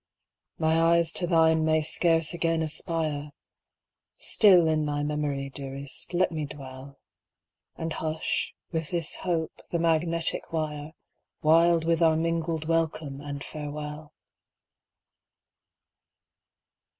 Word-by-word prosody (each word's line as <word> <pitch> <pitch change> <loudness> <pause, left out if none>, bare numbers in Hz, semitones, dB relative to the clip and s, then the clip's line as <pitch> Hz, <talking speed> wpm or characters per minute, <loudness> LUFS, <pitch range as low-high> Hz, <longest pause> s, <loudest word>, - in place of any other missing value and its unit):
My 160 +1 +2
eyes 170 0 +3
to 175 - 0
thine 160 -2 +4
may 155 0 +2
scarce 165 +1 +1
again 165 -1 0
aspire 155 -2 -2 0.8
Still 185 -6 +5
in 155 -1 +1
thy 145 0 -1
memory, 145 -2 -2
dearest 135 +4 -5
let 185 0 +2
me 155 -2 -3
dwell, 135 -1 -10 0.8
And 165 0 -4
hush, 160 0 -2 0.2
with 160 -2 -3
this 170 -3 -1
hope, 165 -3 -2
the 170 - -1
magnetic 165 0 +1
wire, 155 -1 -3 0.5
Wild 165 +1 +4
with 165 0 +1
our 160 -1 +4
mingled 165 -1 -1
welcome 160 -4 -1
and 140 -1 -6
farewell! 150 0 -7
160 Hz, 110 wpm, -27 LUFS, 150-165 Hz, 0.8 s, Still